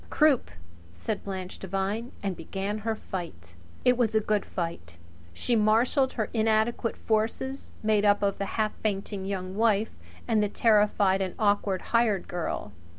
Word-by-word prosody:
"Croup," 300 -5 +3 0.4
said 205 - -4
Blanche 190 -2 -5
Devine, 195 +5 -2
and 195 -2 -1
began 195 +5 -4
her 220 +1 -1
fight. 165 - -7 0.3
It 250 -1 +5
was 225 -3 +2
a - - +6
good 210 -1 0
fight. 165 - -5 0.3
She 235 - 0
marshalled 230 +5 +3
her 225 - 0
little 230 - 0
inadequate 220 +1 +1
forces, 230 +5 -1
made 215 -1 +3
up 205 0 +4
of 200 -1 0
the 200 - -1
half 215 -1 +1
fainting 200 -2 -2
Young 190 -1 -4
Wife 220 0 +2 0.4
and 220 -3 +3
the 210 - +1
terrified 205 -3 +3
and 185 -2 -2
awkward 205 -3 +1
hired 225 -5 +3
girl. 170 -11 -3
210 Hz, 155 wpm, -28 LUFS, 190-225 Hz, 0.4 s, a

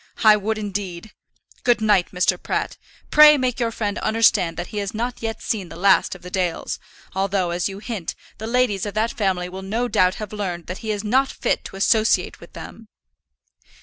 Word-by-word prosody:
I 215 -1 +8
would, 215 +1 -2
indeed. 200 -2 -5 0.5
Good 240 -1 +3
night, 210 -4 +3
Mr. 180 0 +1
Pratt. - - -2 0.4
Pray 300 0 +8
make 255 -2 -1
your 235 -1 +1
friend 210 -2 -3
understand 215 -7 +2
that 175 - -5
he 210 - -2
has 200 +1 -4
not 240 +2 -3
yet 225 -1 -4
seen 195 -6 -2
the - - -10
last 190 +2 +3
of 180 - -14
the 180 - -9
Dales; 180 -3 -2 0.3
although, 190 -2 0
as 175 +3 -1
you 195 - -7
hint, 205 -5 -5 0.2
the 220 - -5
ladies 230 -5 +1
of 205 - -6
that 220 +2 +1
family 190 -4 0
will 190 +1 -8
no 220 +6 -1
doubt 185 -5 +2
have 215 -1 -7
learned 180 -5 -4
that 185 - -6
he 220 - -6
is 205 -1 -2
not 260 +6 +2
fit - - -1
to - - -9
associate 215 +3 +2
with - - -15
them." 225 -1 -10
205 Hz, 200 wpm, -22 LUFS, 185-225 Hz, 0.5 s, I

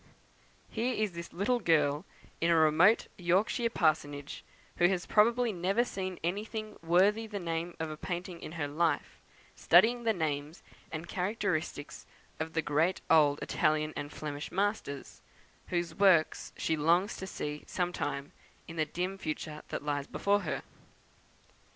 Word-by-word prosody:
Here 235 +3 0
is 215 -2 0
this 170 0 -8
little 215 +7 +1
girl, 150 -3 +2 0.4
in 165 - +3
a 170 - +5
remote 160 +7 +5
Yorkshire 205 +7 +2
parsonage, 145 -7 0 0.3
who 175 - +5
has 180 -1 -1
probably 235 +2 +3
never 195 +6 +1
seen 185 -6 -4
anything 215 +4 -3
worthy 195 +7 +3
the 210 -2 -5
name 170 -1 -3
of 160 -1 -3
a 155 - -6
painting 175 0 -5
in 155 - -7
her 160 -4 -2
life, 160 +3 -1 0.4
studying 240 +2 +5
the 225 - +3
names 155 -4 -3 0.3
and 160 +2 -5
characteristics 180 -6 -2 0.3
of 160 0 -3
the 160 - 0
great 155 +6 +1
old 150 -3 +5
Italian 155 0 +1
and 145 0 -5
Flemish 145 -1 -5
masters, 195 -9 -2 0.5
whose 175 -1 -1
works 185 -5 +3
she 160 - 0
longs 170 +6 +2
to 190 - -6
see 150 -4 -5
some 180 -1 -1
time, 140 -2 -3 0.4
in 165 - -8
the 155 - +2
dim 185 +4 -3
future 155 -1 -4
that - - -4
lies 145 -1 -1
before 200 +1 +1
her! 165 -7 -3
170 Hz, 150 wpm, -31 LUFS, 155-200 Hz, 0.5 s, a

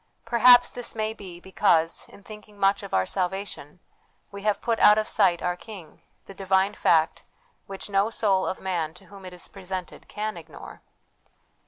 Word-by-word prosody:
Per 235 - -2
haps 245 +1 +7
this 245 -2 -4
may 220 0 -2
be 185 -5 -11
because, 170 -3 +1
in 200 - -16
thinking 210 0 -13
much 195 0 +2
of 200 -2 -9
our 95 - +2
salvation, 185 - -4 0.5
we 200 0 -8
have 210 0 0
put 230 -1 -1
out 210 - +7
of 215 - 0
sight 175 -3 +2
our 180 0 0
King, 190 -3 -12 0.2
the 195 - -11
divine 190 +1 +1
fact 160 -5 +2 0.5
which 195 -1 -7
no 200 +1 +1
soul 195 -4 +1
of 185 - -3
man 170 -4 -3
to 190 - -16
whom 195 -1 -12
it 185 - -8
is 180 - -8
presented 185 -2 -8
can 215 +1 -4
ignore. - - -12
195 Hz, 180 wpm, -25 LUFS, 180-210 Hz, 0.5 s, haps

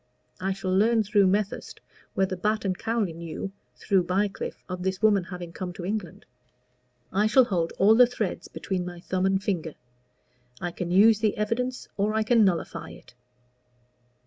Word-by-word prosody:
I 190 +1 -1
shall 190 -1 -2
learn 220 +3 +4
through 205 -1 +3
Methurst 200 +2 -1 0.4
whether 190 0 +1
Batt 210 +4 -1
& - - -31
Cowley 225 -6 -1
knew, 170 +3 -6 0.2
through 195 -2 +2
Bycliffe, 195 +2 -2
of 180 0 -5
this 190 0 -1
woman 205 -4 +3
having 175 -2 -8
come 180 0 -5
to 175 -2 -7
England. 200 -4 -4 0.9
I 205 +3 +3
shall 255 +4 +6
hold 170 -6 -1
all 205 +3 +6
the 245 +2 +7
threads 230 -5 -3
between 185 -2 -3
my 175 -1 -7
thumb 185 +1 0
and 195 0 +1
finger. 170 -6 -2 0.8
I 175 - -3
can 175 0 -5
use 210 +4 +6
the 215 -2 0
evidence 250 +4 -2
or 210 +2 0
I 220 - +2
can 230 0 +4
nullify 185 -4 -1
it. - - -14
195 Hz, 170 wpm, -26 LUFS, 180-215 Hz, 0.9 s, the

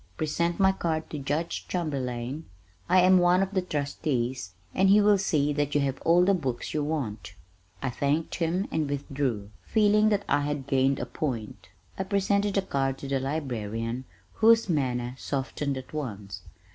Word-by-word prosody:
Present 170 +3 -1
my 190 0 +5
card 160 -4 -2
to 150 - -4
Judge 150 +5 -2
Chamberlain; 135 -4 -3 0.4
I 185 +1 +6
am 185 0 +6
one 180 +2 +4
of 195 - -4
the 190 - +2
trustees, 130 - -2 0.2
and 190 +1 +3
he 205 +2 +7
will 205 -1 +5
see 150 -6 +1
that 145 0 -1
you 145 - +4
have 135 -1 -2
all 175 +2 +4
the 200 - +4
books 135 -10 -3
you 150 - 0
want." 110 -11 -4 0.5
I 130 - 0
thanked 145 +5 -1
him 175 +3 0
and 155 -3 -1
withdrew, 135 -7 -2
feeling 210 0 +3
that 205 -1 0
I 145 - +2
had 145 -2 -2
gained 135 0 +2
a - - -2
point. 110 - -5 0.3
I - - +1
presented 200 +1 +1
the 195 - +2
card 135 -6 -1
to 140 - -7
the 135 0 0
librarian 120 -4 -3 0.3
whose 225 0 +5
manner 125 -7 -1
softened 140 0 -2
at 130 +2 -9
once. 105 -10 -5
145 Hz, 170 wpm, -27 LUFS, 130-180 Hz, 0.5 s, he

